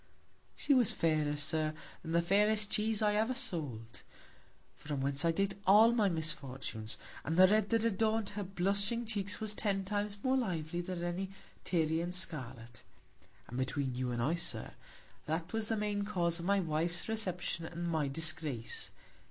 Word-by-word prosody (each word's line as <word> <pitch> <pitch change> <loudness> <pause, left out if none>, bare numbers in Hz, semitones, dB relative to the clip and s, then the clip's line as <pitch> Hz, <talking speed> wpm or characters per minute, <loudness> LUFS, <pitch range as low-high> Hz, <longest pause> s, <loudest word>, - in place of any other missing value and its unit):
She 290 - +2
was 250 -6 +5
fairer, 155 -2 +1
Sir, 155 +1 +1 0.3
than 160 - -6
the 170 0 +3
fairest 210 +3 +3
Cheese 220 -1 +1
I 210 -1 +3
ever 220 +5 +1
sold; 145 - -3 0.7
from 145 -2 -5
whence 140 +1 0
I 165 - +4
date 195 +3 0
all 215 +4 +8
my 220 -4 +3
Misfortunes; 135 -9 -3 0.3
and 160 +2 -2
the 185 - +9
red 210 +1 +2
that 230 -1 +2
adorn'd 220 -1 +1
her 205 0 -4
blushing 200 +5 0
Cheeks 205 -2 -2
was 215 -1 -2
ten 195 -2 -1
Times 205 +1 -2
more 260 0 +3
lively 175 -8 -1
than 175 -1 -5
any 175 +2 -2 0.3
Tyrian 165 0 0
Scarlet. 125 -10 -4 0.7
And 125 - -5
between 130 0 -1
you 125 0 -2
and 120 -1 -1
I, 150 +6 +2
Sir, 170 - -1 0.5
that 165 +3 -2
was 225 -1 0
the 225 - 0
main 205 -1 -1
Cause 175 -4 0
of 170 - -5
my 200 +1 +3
Wife's 170 0 0
Reception, 185 -6 -1
and 175 +1 -4
my 160 -4 0
Disgrace. 155 -5 -2
175 Hz, 165 wpm, -33 LUFS, 155-210 Hz, 0.7 s, the